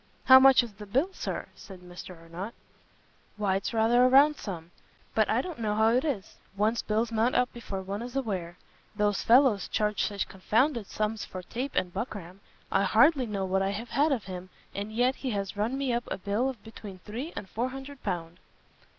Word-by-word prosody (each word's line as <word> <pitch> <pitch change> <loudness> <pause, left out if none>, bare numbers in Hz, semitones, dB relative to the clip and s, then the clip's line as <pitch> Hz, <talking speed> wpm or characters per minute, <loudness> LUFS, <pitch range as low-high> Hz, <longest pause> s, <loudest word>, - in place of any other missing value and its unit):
"How 260 0 +9
much 265 -1 +7
is 230 -3 -8
the 210 +1 -11
bill, 270 - +1
Sir?" - - -4
said 190 -3 -12
Mr 180 0 -10
Arnott. 170 +7 -7 0.8
"Why 200 -2 +1
it's 195 +7 -3
rather 230 +2 +4
a - - +7
round 285 +3 +6
sum; 175 - -7 0.4
but - - +2
I - - +2
don't 350 -7 -7
know 210 -2 0
how 220 +1 +4
it 250 +3 +2
is, 270 -12 -3 0.2
one's 220 +3 +2
bills 220 +2 0
mount 230 +3 +1
up 250 0 +2
before 200 -5 -6
one 200 +3 -4
is 245 +2 -7
aware: 185 -10 -3 0.4
those 205 -1 +1
fellows 240 -4 +4
charge 210 -1 0
such 205 -2 -1
confounded 225 +4 0
sums 215 0 -2
for 185 -1 -7
tape 255 +9 -4
and 180 -1 0
buckram; 195 -6 -6 0.3
I - - +3
hardly 250 +6 +4
know 200 -3 -2
what 190 +1 +1
I 195 - +1
have 220 +5 -5
had 295 +2 +2
of 245 -7 0
him, 185 -1 -7 0.2
and 205 +2 -4
yet 245 +4 +1
he 265 - -3
has 195 0 -4
run 220 +6 -1
me 270 -3 0
up 240 +1 -1
a - - -3
bill 205 +7 0
of 245 -6 -8
between 215 -3 -10
three 245 +10 -5
and 190 - -6
four 240 +6 -2
hundred 270 +1 -9
pound." 175 -2 -4
220 Hz, 205 wpm, -28 LUFS, 195-250 Hz, 0.8 s, How